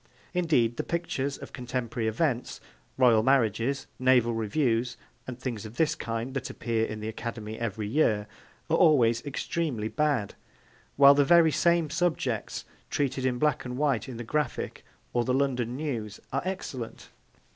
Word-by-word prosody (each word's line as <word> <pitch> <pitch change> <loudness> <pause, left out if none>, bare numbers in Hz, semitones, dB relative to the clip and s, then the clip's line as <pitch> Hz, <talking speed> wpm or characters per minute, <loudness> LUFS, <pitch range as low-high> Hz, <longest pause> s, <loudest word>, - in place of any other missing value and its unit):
Indeed, 150 -10 +2
the - - -1
pictures 140 -5 -2
of - - -11
contemporary 125 -3 -3
events, 125 +2 -1 0.4
Royal 120 -4 +5
marriages, 130 +1 +2
naval 125 -2 +4
reviews 115 +1 0 0.3
and 125 -2 -6
things 125 -5 -4
of 110 +1 -9
this 155 +2 +2
kind 115 -2 -4
that 135 -2 -3
appear 115 -1 -1
in 110 0 -6
the 110 - -4
Academy 110 -1 -5
every 110 -2 -3
year, 110 -4 +2 0.4
are 165 - +2
always 120 -9 +4
extremely 135 -5 -2
bad; 145 -8 0 0.6
while 140 0 +8
the 145 0 +4
very 165 +1 +6
same 170 -1 +2
subjects 160 - -1 0.2
treated 130 -2 0
in 125 -1 0
black 150 +1 +1
and 125 0 -5
white 135 -6 0
in 125 - -6
the 120 - -5
Graphic 150 +2 -2 0.3
or 120 - +2
the 125 +1 +1
London 125 -3 0
News 120 -8 -4
are 135 - +1
excellent. 140 -11 -5
125 Hz, 155 wpm, -28 LUFS, 115-145 Hz, 0.6 s, while